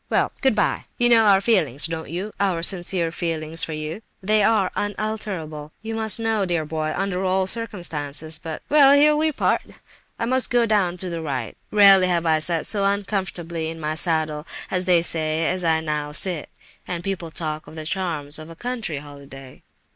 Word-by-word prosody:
Well—good 265 -5 +1
bye! 205 - 0
You 240 0 +5
know 225 -2 +6
our 195 -1 +5
feelings, 170 - +2
don't 165 0 -5
you—our 185 -1 -2
sincere 175 -2 0
feelings 165 -1 0
for 160 - -2
yourself? 155 +6 -5 0.2
They 215 +2 +3
are 200 -2 +2
unalterable, 195 -8 -4
you 225 0 -4 0.2
know, 225 -2 0
dear 170 -4 -1
boy, 155 0 -3
under 190 -1 -2
all 190 0 +1
circumstances, 160 - -1
but—Well, 275 - +3
here 300 +1 +5
we 310 +1 +1
part; - - +1 0.6
I - - -2
must 255 0 +1
go 240 -1 +3
down 195 -5 +1
to 185 0 -4
the 165 -1 -4
right. 140 -4 -4
Rarely 195 -3 +6
have 175 -2 0
I 160 -1 +3
sat 165 +1 +3
so 205 -2 +1
uncomfortably 190 -5 -2
in 165 0 -7
my 155 0 -2
saddle, 155 -2 -1 0.2
as 185 -1 0
they 175 -2 +4
say, 160 -1 +1
as 180 +2 0
I 160 -1 +2
now 150 -1 -3
sit. 175 -1 +1 0.4
And 175 -1 -4
people 190 -4 -4
talk 155 -1 -4
of - - -12
the 155 -1 -7
charms 155 -5 -2
of 155 +1 -10
a 165 - -11
country 230 - -4
holiday!" 140 -2 -12
175 Hz, 175 wpm, -22 LUFS, 155-205 Hz, 0.6 s, know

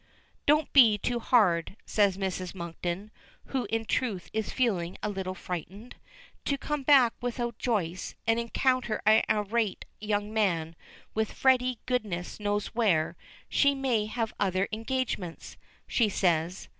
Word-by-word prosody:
"Don't 300 +1 +3
be 230 -7 +7
too 240 +3 -1
hard," 200 -6 +2
says 200 -3 +2
Mrs. 190 -1 -3
Monkton, 175 +3 -5 0.3
who 255 -5 -2
in 225 +1 -1
truth 215 -7 -2
is 220 -1 -2
feeling 190 -9 0
a - - 0
little 190 -2 -4
frightened. 185 +6 -7 0.5
To 280 - 0
come 295 +1 -3
back 265 -4 +5
without 240 -1 -3
Joyce, 185 -7 -2
and 225 +1 +2
encounter 240 -1 0
an 215 +1 +6
irate 210 0 0
young 210 0 -2
man, 170 -7 0 0.4
with 220 -1 -1
Freddy 255 -2 +2
goodness 210 -10 -2
knows 205 -1 -1
where 190 -10 +2 0.3
"She 280 -1 +3
may 245 -6 0
have 225 0 -2
other 190 -1 +1
engagements," 225 -6 -3 0.3
she 230 -4 +2
says. 175 -2 0
215 Hz, 135 wpm, -28 LUFS, 185-240 Hz, 0.5 s, be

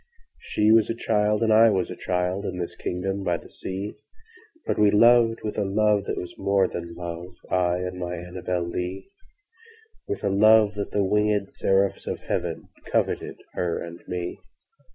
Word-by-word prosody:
I 105 +1 +5
was 110 -1 +5
a 115 - -1
child 105 -1 +1
and 110 - +2
she 110 - +6
was 95 -2 -1
a - - -5
child, 90 +2 -1
In 90 - -4
this 85 -1 -4
kingdom 95 +2 -3
by 90 -2 +1
the - - -15
sea, 95 +2 -5 0.7
But - - -1
we 105 -1 +6
loved 115 +2 +5
with 105 0 -3
a - - +2
love 105 0 +2
that - - -3
was 90 - -5
more 100 -1 +2
than 85 -1 -6
love—I 90 +1 -2
and 90 0 -4
my 90 0 -3
ANNABEL 90 0 -3
LEE—With 410 - -8
a 100 - +2
love 105 +1 +5
that 100 -1 -4
the 100 -1 +1
wingèd 105 0 +1
seraphs 95 0 +1
of - - -2
heavenCoveted - - -2 0.2
her 85 -2 -1
and 85 0 -8
me. 90 -1 -4
100 Hz, 165 wpm, -25 LUFS, 90-105 Hz, 0.7 s, she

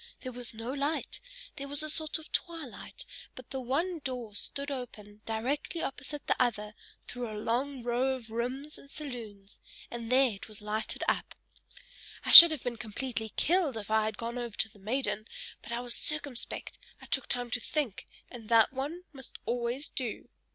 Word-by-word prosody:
There 255 - -5
was 245 -1 -8
no 230 +4 -4
light; 285 +3 -2 0.4
there 280 -1 -5
was 285 +2 +1
a - - -3
sort 310 0 0
of 315 +1 -13
twilight, 330 -7 -4 0.3
but 255 - -12
the 265 - -3
one 320 +8 -1
door 250 -6 -5
stood 280 +6 -4
open 215 -5 -7
directly 255 +9 -2
opposite 285 +1 -5
the - - +2
other 210 -4 0 0.3
through 245 -2 -5
a 215 - -6
long 250 +4 -1
row 250 +2 +1
of 230 -4 -11
rooms 255 +6 -4
and 275 - -16
saloons, 225 -10 -8 0.3
and 235 0 -5
there 260 -1 +5
it 195 - -9
was 215 -2 -9
lighted 210 +1 -3
up. - - -1 0.9
I - - +1
should 340 0 +16
have 310 -5 -4
been 240 -1 -3
completely 225 0 -3
killed 330 -7 +2
if 215 0 -6
I 220 0 +3
had 220 -1 -3
gone 235 +1 -4
over 235 -3 -5
to 220 - +1
the 210 -1 -20
maiden; 220 0 -2 0.3
but - - -10
I 235 +1 -1
was 245 -1 +2
circumspect, 290 -5 -2 0.2
I - - -13
took 270 - 0
time 245 -1 -2
to 250 - +1
think, 250 -4 -3 0.2
and 230 -4 -11
that 230 +1 +5
one 295 +7 -4
must 265 -1 -8
always 240 +4 -1
do." 245 -5 -5
245 Hz, 185 wpm, -30 LUFS, 225-280 Hz, 0.9 s, should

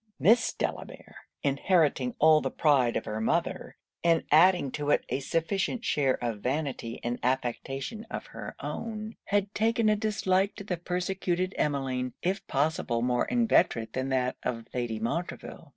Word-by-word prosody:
Miss 225 - +4
Delamere - - -5 0.3
inheriting 140 -3 +2
all 155 0 +6
the - - -1
pride 135 -7 +3
of - - -4
her 110 +1 -3
mother, 110 - -1 0.3
and 165 -1 +3
adding 165 -2 +5
to 145 +1 -3
it - - +3
a - - 0
sufficient 195 - -1
share 135 -3 +2
of 115 -3 -2
vanity 130 -2 -3
and 120 +1 -2
affectation 135 - -2
of - - -5
her - - -7
own, 220 -1 -5
had 200 0 0
taken 225 +1 +2
a 215 - +4
dislike 200 -2 +1
to 200 - -8
the 185 -3 -3
persecuted 180 +1 -1
Emmeline, 130 -4 -1
if 195 +2 -1
possible 135 -5 0
more 125 0 +1
inveterate 175 - +2
than 130 +1 -2
that 130 -1 0
of 115 -2 -3
Lady 120 -3 -2
Montreville. 165 +11 -4
155 Hz, 150 wpm, -28 LUFS, 125-195 Hz, 0.3 s, all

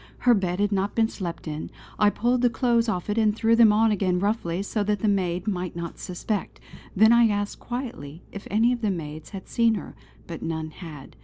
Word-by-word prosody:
Her 245 - +4
bed 185 -3 0
had 205 0 +1
not 200 0 -1
been 225 -1 +3
slept 170 -6 -6
in; 155 0 -5 0.3
I 210 - +6
pulled 240 +4 0
the 245 - +4
clothes 235 -1 +1
off 180 -5 -2
it 210 +2 0
and 215 -1 +3
threw 225 0 +3
them 230 -2 +7
on 220 +1 +3
again 185 -3 +1
roughly 195 -2 -1
so 210 +1 -1
that 210 -1 0
the 220 - +1
maid 185 -2 0
might 180 -4 -2
not 170 -1 -6
suspect. 190 +3 -4 0.4
Then 220 +3 +6
I 235 -1 +6
asked 205 -1 -2
quietly 225 - -6
if 200 - -8
any 225 +4 +3
of 240 - -4
the 215 - +1
maids 155 -4 -5
had 195 -3 -9
seen 230 -1 +2
her; 205 - -7 0.3
but 170 - -7
none 160 -1 -3
had. 155 -5 -10
205 Hz, 220 wpm, -25 LUFS, 180-225 Hz, 0.4 s, them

